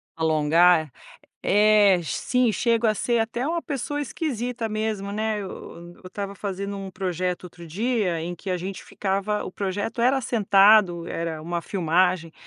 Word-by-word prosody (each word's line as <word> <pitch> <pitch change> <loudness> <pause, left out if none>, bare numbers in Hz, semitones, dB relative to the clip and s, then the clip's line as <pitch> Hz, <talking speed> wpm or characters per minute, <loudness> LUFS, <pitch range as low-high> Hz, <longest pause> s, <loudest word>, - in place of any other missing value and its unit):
Alongar, 160 0 +3 0.5
é? - - -8
É, 205 -2 +5
sim, 250 - 0
chego 230 +1 +1
a 215 - +2
ser 235 +2 0
até 235 +3 -2
uma 335 +2 -1
pessoa 290 +1 -3
esquisita 245 -6 -3
mesmo, 215 -2 -3
né. 215 0 -1
Eu 175 -2 -9
estava 200 +2 -6
fazendo 200 0 -4
um 195 -1 -6
projeto 180 -1 -3
outro 175 -1 -11
dia 195 0 -1
em 175 +2 -4
que 190 +2 -7
a 180 - +1
gente 185 +2 -6
ficava, 200 +1 -2
o - - -7
projeto 205 +4 -3
era 260 +3 +3
sentado, 200 -6 +4
era 165 -2 -4
uma 170 +1 -3
filmagem, 180 -2 +1
195 Hz, 155 wpm, -24 LUFS, 175-220 Hz, 0.5 s, É